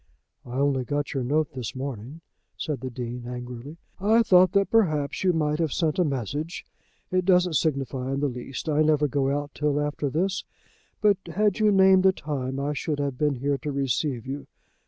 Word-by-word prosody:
"I 120 - -8
only 135 -1 +1
got 145 +4 -2
your 135 -3 -1
note 150 +4 +1
this 125 0 -5
morning," 130 +3 -6 0.4
said 145 -6 -3
the 130 - -4
Dean 120 0 -6
angrily. 125 +4 -7 0.2
"I 220 +4 +4
thought 185 -4 +6
that 200 -1 +2
perhaps 155 -11 +1
you 185 - +4
might 150 -2 0
have 160 -4 0
sent 160 +2 0
a - - +5
message. 145 - -3 0.5
It 185 0 +2
doesn't 180 -2 +3
signify 135 -4 -1
in - - -2
the 145 - +1
least. 125 +3 -6
I 155 -1 +2
never 150 -1 +3
go 135 0 0
out 145 +1 -2
till 150 -1 0
after 145 -1 -1
this, 185 +7 -1 0.6
but 205 -3 +4
had 210 0 +1
you 215 -1 +4
named 190 -1 +6
a - - +6
time 135 -6 -4
I 145 +1 -1
should 150 +1 -2
have 140 -3 -3
been 150 -2 +2
here 140 +2 -1
to 150 - -4
receive 135 -2 -1
you. 135 +2 -6
145 Hz, 195 wpm, -26 LUFS, 135-165 Hz, 0.6 s, thought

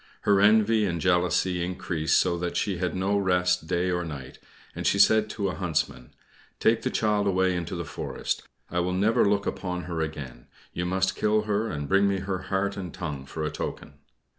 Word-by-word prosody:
Her 100 -1 +3
envy 110 +1 +5
and 85 -3 -1
jealousy 90 0 +1
increased 85 -3 0
so 85 - +1
that 90 0 -2
she 95 -4 0
had 90 -1 -2
no 100 +2 +1
rest 90 -3 +1
day 90 +1 0
or 90 0 -1
night, 70 -5 -8 0.4
and - - -2
she - - +3
said 110 +2 +5
to 100 -3 -2
a - - -3
Huntsman, 60 -4 -2 0.5
"Take 115 0 +3
the - - -1
child 105 -2 +1
away 95 -1 +2
into 85 +1 -3
the 85 -1 -4
forest. - - -4 0.3
I 90 - 0
will 90 +1 0
never 105 +5 +3
look 100 0 +1
upon 90 -1 -3
her 85 -2 -3
again. 70 -6 -6 0.3
You 90 +1 -2
must 95 0 0
kill 105 0 +2
her, 105 +1 -1
and 75 -1 -4
bring 100 +3 +4
me 100 -1 0
her 95 -1 -2
heart 100 +1 0
and 90 -3 -5
tongue 75 -6 -6
for 80 +2 -5
a 75 - -1
token." - - -5
90 Hz, 200 wpm, -26 LUFS, 85-100 Hz, 0.5 s, envy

